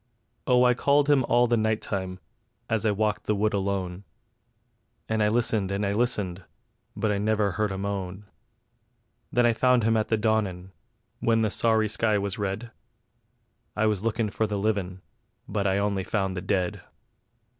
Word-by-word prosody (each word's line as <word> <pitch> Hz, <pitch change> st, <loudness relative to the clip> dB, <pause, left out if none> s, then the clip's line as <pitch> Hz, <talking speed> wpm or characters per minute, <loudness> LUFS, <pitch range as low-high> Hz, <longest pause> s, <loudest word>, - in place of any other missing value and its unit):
Oh 125 Hz, 0 st, +5 dB
I 125 Hz, 0 st, +5 dB
called 140 Hz, +3 st, +3 dB
him 135 Hz, -3 st, +4 dB
all 120 Hz, +1 st, +4 dB
the 120 Hz, 0 st, +2 dB
night 110 Hz, -1 st, +1 dB
time, 95 Hz, -2 st, -4 dB, 0.5 s
as 110 Hz, -1 st, 0 dB
I -, -, +3 dB
walked 105 Hz, +1 st, -1 dB
the 105 Hz, -, +1 dB
wood 105 Hz, +1 st, +1 dB
alone; 95 Hz, -2 st, -2 dB, 1.0 s
And 110 Hz, 0 st, 0 dB
I 105 Hz, -, +4 dB
listened 110 Hz, -3 st, +1 dB
and 100 Hz, +1 st, -1 dB
I 100 Hz, -, 0 dB
listened, 100 Hz, -5 st, -1 dB, 0.5 s
but 110 Hz, -, 0 dB
I 100 Hz, -, 0 dB
nivver 105 Hz, -1 st, +1 dB
heard 105 Hz, +2 st, -1 dB
a 95 Hz, -, -4 dB
moan; 100 Hz, 0 st, -4 dB, 1.1 s
Then 120 Hz, 0 st, +3 dB
I 120 Hz, -, +4 dB
found 125 Hz, 0 st, +3 dB
him 115 Hz, +1 st, +2 dB
at 110 Hz, -1 st, +1 dB
the 110 Hz, -, +1 dB
dawnin', 105 Hz, -4 st, -1 dB, 0.5 s
when 115 Hz, -1 st, +2 dB
the 110 Hz, -, +1 dB
sorry 110 Hz, -2 st, +2 dB
sky 110 Hz, 0 st, +1 dB
was 100 Hz, +2 st, -2 dB
red: 105 Hz, +4 st, -3 dB, 1.0 s
I 105 Hz, -, +1 dB
was 105 Hz, -2 st, 0 dB
lookin' 115 Hz, -1 st, -1 dB
for 110 Hz, -, 0 dB
the 105 Hz, -1 st, -2 dB
livin', 100 Hz, -3 st, -2 dB, 0.4 s
but 100 Hz, -1 st, -1 dB
I 95 Hz, 0 st, +2 dB
only 100 Hz, -1 st, 0 dB
found 95 Hz, -2 st, -1 dB
the 90 Hz, -, -3 dB
dead. 95 Hz, -1 st, -1 dB
105 Hz, 175 wpm, -26 LUFS, 100-110 Hz, 1.1 s, Oh